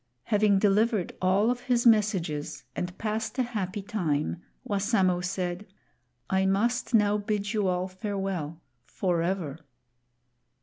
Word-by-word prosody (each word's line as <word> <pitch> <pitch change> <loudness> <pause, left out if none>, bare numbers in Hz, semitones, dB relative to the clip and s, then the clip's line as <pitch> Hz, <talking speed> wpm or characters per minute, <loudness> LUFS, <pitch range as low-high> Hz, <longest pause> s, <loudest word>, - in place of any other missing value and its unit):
Having 210 -2 +3
delivered 210 0 +2
all 195 +5 +3
of 250 - -2
his 245 -2 0
messages 190 - +2
and 180 +1 -4
passed 220 +1 -3
a 255 - +3
happy 205 -4 -3
time, 170 -6 -1 0.3
Wassamo 195 -3 +2
said, 180 +1 -3 0.6
"I 190 0 +2
must 235 +5 +1
now 210 -1 +4
bid 205 0 -2
you 210 -3 +1
all 180 0 0
farewell 185 -5 -4 0.2
forever." 170 -4 -1
195 Hz, 120 wpm, -28 LUFS, 180-215 Hz, 0.6 s, now